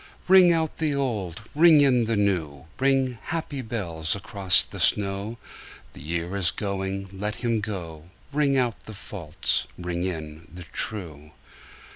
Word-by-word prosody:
Ring 185 -1 +7
out 160 -2 0
the 155 -3 +1
old, 110 -9 -3
ring 155 0 +6
in 125 -4 +4
the 115 0 0
new, 85 -9 -1
Ring, 135 -3 +1
happy 160 -4 -4
bells, 85 -9 -2
across 100 -2 +5
the - - -9
snow: 100 +3 0 0.6
The - - -12
year 85 +4 -3
is 95 -4 +1
going, 95 +1 -3
let 105 +2 -4
him 115 -2 +1
go; 85 -6 -6 0.2
Ring 140 -2 +2
out 120 -4 -1
the 110 - -9
false, 90 -6 -2
ring 90 -1 -3
in 80 -3 -5
the 90 +1 -9
true. 80 -5 -5
100 Hz, 145 wpm, -25 LUFS, 85-130 Hz, 0.6 s, Ring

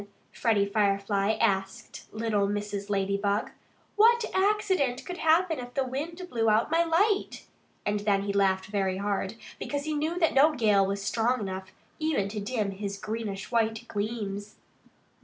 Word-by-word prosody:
Freddie 215 -4 +2
Firefly 200 0 +1
asked 195 -3 -2
little 215 -2 0
Mrs. 205 0 -3
Ladybug. 200 +1 0 0.4
"What 465 +2 +5
accident 380 -10 +1
could 360 -1 -6
happen 325 0 +3
if 245 0 -8
the 270 - +2
wind 320 +8 -5
blew 225 -7 +1
out 220 +7 +2
my 330 +1 +4
light?" 390 +5 +1 0.4
And 205 0 0 0.2
he 200 0 -2
laughed 190 -1 +2
very 195 -2 -1
hard, 200 +1 -2 0.2
because 285 0 -3
he 310 +1 -2
knew 310 +4 -1
that 330 -3 +2
no 300 +3 +5
gale 205 -4 +3
was 200 0 -3
strong 235 +4 +1
enough 190 -1 -5 0.3
even 310 -11 0
to 210 +1 -4
dim 210 -1 -2
his 200 0 -5
greenish 210 -1 -5
white 225 0 0
gleams. 205 -1 -4
215 Hz, 150 wpm, -28 LUFS, 200-290 Hz, 0.4 s, What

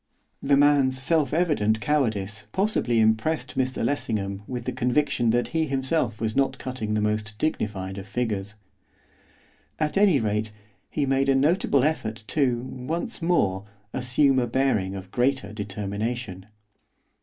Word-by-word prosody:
The 140 0 +3
man's 140 -2 +4
self 145 0 +2
evident 145 -10 +2
cowardice 110 -6 -1
possibly 190 - +1
impressed 110 +11 +1
Mr 130 -1 0
Lessingham 100 -8 -2
with 125 -1 -5
the - - -1
conviction 125 -1 +1
that 120 +2 +1
he 160 -1 0
himself 135 -4 -1
was 110 -1 -2
not 135 -1 +1
cutting 120 -5 -3
the 105 - +1
most 105 0 -1
dignified 100 -9 -2
of 95 - -9
figures. 110 -4 -3 1.2
At 155 +5 +1
any 195 -8 +5
rate, 105 -1 -1 0.4
he 145 - -1
made 135 0 +1
a 135 - +4
notable 140 -1 +3
effort 110 -8 -1
to, 125 -5 +1
once 160 - -4
more, 100 - +1 0.3
assume 130 +2 +2
a 120 - 0
bearing 115 -7 0
of 95 -1 -8
greater 125 -4 0
determination. 105 0 -4
125 Hz, 140 wpm, -25 LUFS, 105-140 Hz, 1.2 s, any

